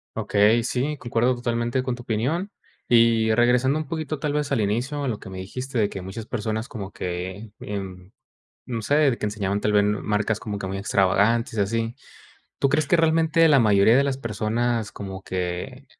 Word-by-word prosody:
Okey, 105 +3 +3
sí, 130 +5 -1
concuerdo 120 +1 +1
totalmente 120 +1 -1
con 125 -1 -2
tu 120 - -11
opinión. 140 - -1 0.4
Y 115 -2 +4
regresando 125 +5 +3
un 155 - -5
poquito, 155 -2 -4
tal 150 0 -1
vez, 150 -1 -1
al 125 -6 +2
inicio, 125 +8 -1
a 140 - -1
lo 115 - -2
que 95 - -11
me 95 - -7
dijiste, 125 +7 -4
de 105 -2 +2
que 95 - -7
muchas 105 +4 -7
personas 110 0 -3
como 100 -6 -7
que, 95 +4 -5
em, 95 -2 -7 0.5
no 115 -3 -4
sé, 140 +1 +2
que - - -3
enseñaban 100 -1 -2
tal 105 - +1
vez 105 -1 +4
marcas 105 +1 -1
como 105 -2 -4
que 95 - -4
muy 95 - -4
extravagantes, 100 +4 +2
y 105 - 0
así. 115 +3 -1 0.6
¿Tú - - +2
crees 145 +1 +1
que - - +4
realmente 165 0 +4
la 140 -3 +5
mayoría 105 +1 +5
de 140 - +5
las 140 -2 -1
personas 115 -1 -1
como 95 -1 -7
que 95 +10 -4
115 Hz, 190 wpm, -24 LUFS, 105-130 Hz, 0.6 s, la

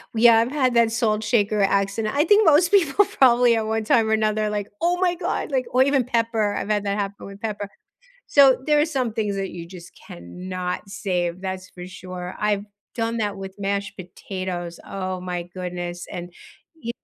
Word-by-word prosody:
yeah, 230 0 +6
I've 230 +3 0
had 260 -4 +1
that 235 -1 +5
salt 220 -2 +1
shaker 210 -2 +1
accident, 200 +3 0
I 290 - +4
think 410 +6 +5
most 320 +3 +5
people 390 -2 +4
probably 245 -5 +4
at 220 - -1
one 220 0 -1
time 220 +1 +3
or - - +2
another 215 -1 +1
like, 205 -1 -3
"Oh 350 +1 +2
my 355 -1 +2
god," 350 -2 -3
like 260 -2 0
or 255 +1 +5
even 275 -2 +2
pepper, 230 -3 0
I've 200 - -4
had 210 -1 0
that 200 0 -1
happen 200 -1 -4
with 200 +1 -12
pepper. 210 -2 -4 0.6
So, 275 -2 +6
there 300 -1 +4
are - - +4
some 265 -8 -2
things 210 -2 -2
that 195 -1 -3
you 170 -1 -8
just 175 -1 -12
cannot 180 - -6
save, 180 -3 -2
that's 185 -1 -5
for 180 -1 -9
sure, 180 -1 -8
I've 210 -1 0 0.3
done 230 0 -1
that 205 -2 -2
with 195 -1 -8
mashed 200 +1 -2
potatoes, 180 -1 -6
oh 185 -1 -4
my 180 -1 -4
goodness, 175 -1 -6
and 175 0 -6 0.5
y 235 - -2
210 Hz, 195 wpm, -23 LUFS, 185-235 Hz, 0.6 s, yeah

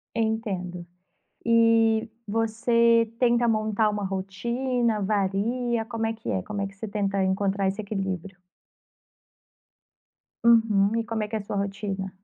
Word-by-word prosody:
Entendo. 200 -6 -2 0.6
E 230 -1 +4 0.2
você 230 +1 +2
tenta 240 -1 +3
montar 215 -1 +1
uma 205 -1 -3
rotina? 225 +5 -1
Varia? 220 +4 0
Como 225 0 -2
é 225 - -1
que 225 - -7
é? 95 -2 0
Como 205 - -5
é 200 - -1
que 195 - -15
você 215 +2 -6
tenta 200 -1 -1
encontrar 195 +1 0
esse 200 +3 -2
equilíbrio? 195 -3 -4 2.1
Uhum, 225 -2 +4
e 225 - -3
como 225 -2 -3
é 210 - -3
que 220 - -3
é - - 0
a - - -6
sua 205 - -5
rotina? 195 -1 -3
215 Hz, 140 wpm, -26 LUFS, 195-230 Hz, 2.1 s, E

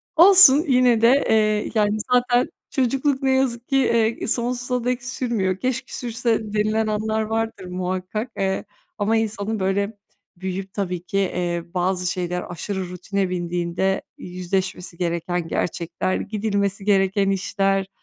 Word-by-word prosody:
Olsun 340 -4 +8
yine 250 -3 +4
de, 255 +5 +5
eee, 215 -1 +2
yani, 210 0 +2
zaten 245 0 +3 0.2
çocukluk 270 +2 0
ne 265 - +3
yazık 250 -2 0
ki, 270 - +1
eee, 230 -3 +1
sonsuza 245 +1 -1
dek 250 0 -1
sürmüyor. 235 -7 -1
"Keşke 255 +3 -3
sürse" 235 -1 -1
denilen 215 +1 +1
anlar 215 +1 -1
vardır 225 -2 -3
muhakkak, 185 +5 -3
eee, 190 +1 -1 0.3
ama 220 +2 +1
insanın, 220 -1 -2
böyle, 200 +3 -1 0.4
büyüyüp 190 +1 -5
tabii 180 -4 -3
ki, 195 - -3
eee, 175 -3 -1
bazı 180 0 0
şeyler 180 0 -3
aşırı 185 +1 -4
rutine 190 +1 -2
bindiğinde 175 +1 -1 0.2
yüzleşmesi 180 0 -4
gereken 170 0 -2
gerçekler, 175 +2 -2
gidilmesi 200 -2 -2
gereken 195 -1 +2
işler, 195 0 0
205 Hz, 130 wpm, -22 LUFS, 185-235 Hz, 0.4 s, Olsun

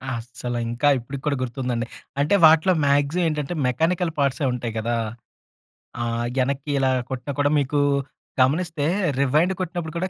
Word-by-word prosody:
అస్సల 120 +1 -6
ఇంకా 120 +5 0
ఇప్పటికి 135 +3 -7
కూడా 145 -2 +1
గుర్తుందండి. 125 -2 -2 0.3
అంటే 150 +8 +3
వాటిలో 160 +4 +6
మ్యాక్సిమమ్ 145 +5 +2
ఏంటంటే 150 0 -2
మెకానికల్ 165 +7 +1
పార్ట్సె 140 0 +1
ఉంటాయి 120 -2 -4
కదా. 120 +2 -1 1.1
ఆ - - 0 0.4
యనక్కి 140 +3 -1
ఇలా 130 -1 +2 0.2
కొట్టిన 130 +2 -4
కూడా 145 0 +3
మీకు 145 +1 0 0.6
గమనిస్తే 155 +3 +1 0.4
రివైండ్ 155 +7 +3
కొట్టినప్పుడు 175 -3 -4
కూడా 185 +2 -1
140 Hz, 135 wpm, -23 LUFS, 125-160 Hz, 1.1 s, వాటిలో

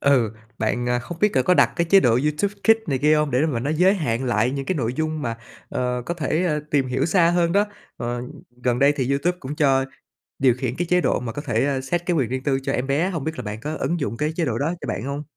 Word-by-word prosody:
ừ, 130 -7 +3 0.3
bạn, 120 +3 -1
à, 120 0 +2
không 165 +8 -8
biết 210 - +5
c 130 - +2
có 180 - +4
đặt - - +4
cái 170 - +2
chế 195 - +7
độ 120 - +3
YouTube 150 - 0
Kids 225 -4 +3
này 135 -2 +1
kia 150 +3 +4
hông 150 -1 +1
để 125 - +1
mà 120 -5 -2
nó 140 +4 -2
giới 180 +5 +4
hạn 130 - -1
lại 120 0 +1
những 135 0 -3
cái 185 - -1
nội 120 -3 -1
dung 155 -1 -2
mà, 115 -1 -2 0.3
ờ, 125 -1 -2
có 170 - -2
thể, 165 +1 -1
ơ, 150 -3 0
tìm 140 -3 +2
hiểu 130 +4 0
xa 170 0 +4
hơn 175 -1 +2
đó? 200 +1 +4 0.3
Ờ, 120 0 -3 0.4
gần 125 -1 +1
đây 140 +1 +5
thì 130 -3 -1
YouTube 165 +6 +1
cũng 135 +2 -5
cho 135 -4 +3 0.5
điều 130 -3 +4
khiển 125 -1 -3
cái 175 - 0
chế 180 0 +4
độ - - +1
mà 120 -2 -4
có 145 +4 -5
thể, 120 -4 0
ơ, 140 -2 0
set 170 +6 -2
cái 175 - +1
quyền 130 -6 +1
riêng 130 +1 -3
tư 135 -2 +1
cho 135 - -2
em 125 0 -1
bé, 155 +8 +1
hông 165 -6 -4
biết 160 0 -3
là - - -3
bạn 105 +1 -6
có 150 +4 -4
ứng 170 +2 -1
dụng 115 -5 -2
cái 150 +3 -1
chế 170 - +1
độ 120 -6 -1
đó 160 +5 -1
cho - - -6
bạn - - -2
hông? 140 +2 -3
140 Hz, 290 wpm, -23 LUFS, 125-165 Hz, 0.5 s, chế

